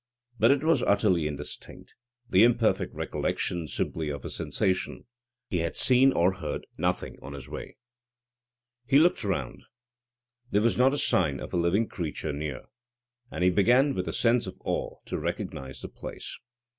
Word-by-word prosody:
But 115 - +5
it 140 +1 +3
was 165 +1 +3
utterly 95 -6 +2
indistinct; 75 -1 -7 0.3
the 95 +1 +5
imperfect 120 -1 +3
recollection 85 -3 -2
simply 80 +1 -2
of 70 -3 -5
a - - -4
sensation. 95 -1 -1 0.4
He 90 - -1
had 85 0 -2
seen 130 +1 +5
or 90 -2 +3
heard 75 -5 -4
nothing 90 +2 -1
on 70 - -8
his 70 -2 -8
way. - - -8 1.1
He 135 - +5
looked 165 -3 +4
round. 90 -11 -2 0.9
There 105 -1 +2
was 115 - +3
not 130 +3 +4
a - - -2
sign 75 - +2
of - - -8
a - - +1
living 90 +6 +2
creature 75 -4 -4
near. 70 -2 -4 0.7
And - - -3
he 90 - +5
began 125 +9 +4
with 90 - -3
a - - -1
sense 115 -2 +2
of 95 - -7
awe - - -2
to - - -3
recognise 65 0 -5
the - - -5
place. - - -8
95 Hz, 165 wpm, -28 LUFS, 80-120 Hz, 1.1 s, But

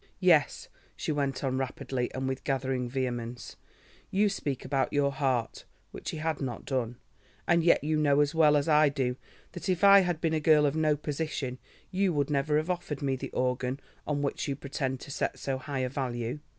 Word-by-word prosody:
"Yes," - - +3 0.3
she - - -3
went 140 -2 -1
on 130 -1 0
rapidly 130 -1 -3
and 130 0 -2
with 130 0 -3
gathering 130 -2 -1
vehemence, 120 -2 -4 0.5
"you 205 +2 +3
speak 145 -9 -3
about 135 0 0
your 145 -1 +2
heart"—which 130 -4 -3
he - - -4
had 155 -1 -2
not 130 -3 -4
done—"and 130 +6 -2
yet 170 - +4
you 155 +1 +1
know 145 -2 +3
as 145 +1 +2
well 155 -2 +5
as 145 - 0
I 150 -1 +5
do 130 -3 -1 0.4
that 175 +2 -6
if 185 +1 0
I 200 0 +9
had 175 -4 0
been 160 -1 0
a 160 - +2
girl 150 -1 +5
of 145 +1 +1
no 155 -2 +2
position 145 -4 -3 0.3
you 190 -1 +1
would 145 -1 0
never 150 +1 +2
have 155 +4 0
offered 155 -5 -4
me 135 -1 +1
the 130 - -6
organ 125 +1 -1 0.3
on 145 -1 -1
which 140 - -2
you 140 - -1
pretend 135 -1 -3
to - - -9
set - - -2
so 135 -1 -3
high 140 0 -4
a 130 - -1
value. 125 -1 -3
140 Hz, 195 wpm, -29 LUFS, 130-155 Hz, 0.5 s, I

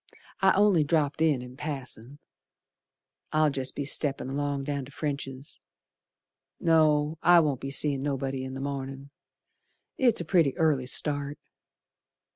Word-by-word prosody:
I 190 0 +5
only 200 -5 +4
dropped 145 0 0
in 150 -6 +2
in 125 0 -11
passin'. 135 -3 -7 1.1
I'll 155 -1 +3
jest 130 -1 -2
be 145 - -3
steppin' 140 -2 -1
along 140 0 -2
down 140 0 -3
to 135 - -14
French's. 140 -2 -5 1.0
No, 155 -1 +3
I 175 0 +7
won't 145 -5 0
be 135 - -4
seein' 140 0 +1
nobody 135 -1 -2
in 130 0 -6
the 135 - -5
mornin', 135 0 -5 0.9
It's 245 -4 +3
a 170 - -4
pretty 160 -5 +2
early 150 -6 +1
start. 145 +1 -2
145 Hz, 135 wpm, -27 LUFS, 135-155 Hz, 1.1 s, I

